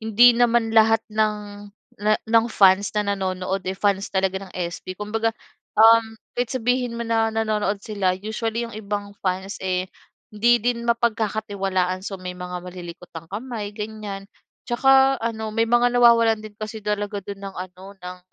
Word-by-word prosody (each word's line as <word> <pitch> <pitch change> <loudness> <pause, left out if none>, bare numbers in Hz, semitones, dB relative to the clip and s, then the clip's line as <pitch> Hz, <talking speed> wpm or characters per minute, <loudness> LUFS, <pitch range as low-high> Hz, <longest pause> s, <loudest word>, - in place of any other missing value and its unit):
hindi 225 +3 +6
naman 235 -1 +2
lahat 225 0 +4
ng 210 -1 -2 0.3
na 215 +1 +3
ng 230 0 +3
fans 195 -1 +4
na 210 - +2
nanonood, 190 0 -2
eh, 190 - -3
fans 200 0 0
talaga 190 0 0
ng - - -18
SB. 180 +1 -5
Kumbaga 220 +3 -1 0.5
um, 225 0 +6 0.2
kahit 245 -1 -1
sabihin 245 -1 -1
mo 235 - -3
na 225 -1 +1
nanonood 215 -2 -1
sila 195 -4 0
usually 220 +3 -3
'yong 230 - -8
ibang 205 -1 -4
fans 190 +1 -3
eh, 185 -1 -1 0.5
hindi 235 +3 +4
din 235 0 -2
mapagkakatiwalaan. 205 -5 0
So, 195 0 -6
may 185 -1 -6
mga 180 0 -7
malilikot 180 -1 -10
ang 165 0 -9
kamay 210 0 -6
ganyan. 210 -2 -6 0.4
Tsaka 270 +2 +4
ano 220 -1 -3
may 225 +1 +1
mga 240 +1 +3
nawawalan 230 -2 +5
din 215 -1 -11
kasi 215 0 -6
talaga 205 0 -2
do'n 200 +1 -8
ng 195 -1 -7
ano, 185 +2 -9
ng 180 -2 -9
210 Hz, 160 wpm, -23 LUFS, 195-230 Hz, 0.5 s, hindi